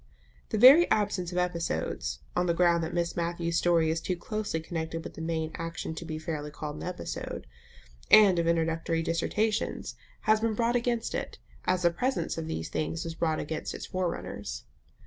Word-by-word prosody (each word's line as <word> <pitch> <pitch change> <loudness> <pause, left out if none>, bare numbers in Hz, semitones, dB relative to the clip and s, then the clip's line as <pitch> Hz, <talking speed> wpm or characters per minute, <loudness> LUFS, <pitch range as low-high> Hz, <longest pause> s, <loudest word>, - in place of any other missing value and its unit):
The 220 - -1
very 275 +10 +9
absence 200 -4 +1
of 180 - -4
episodes 160 - -1
(on 180 0 +1
the 170 - +2
ground 170 -1 +3
that 160 - -3
Miss 170 -1 -1
Matthews's 170 0 0
story 165 -2 +3
is 165 0 -1
too 185 - -1
closely 210 -1 -3
connected 160 0 -4
with - - -8
the - - -8
main 160 -1 -2
action 165 -1 -4
to 160 - -6
be 160 -1 -4
fairly 155 -2 -4
called 150 0 -6
an - - -8
episode) 180 0 -5 0.6
and 200 -5 +8
of 165 - +1
introductory 165 0 +1
dissertations 210 +7 -1 0.3
has 215 0 +4
been 225 -1 0
brought 235 +2 +1
against 235 -1 0
it, - - -4 0.3
as 185 0 +1
the 170 - +5
presence 255 +10 -1
of 165 -1 -4
these 80 - -3
things 160 +1 -2
was 165 - -4
brought 160 -1 0
against 155 +1 -4
its - - -6
forerunners. 175 - -4
170 Hz, 185 wpm, -29 LUFS, 160-185 Hz, 0.6 s, very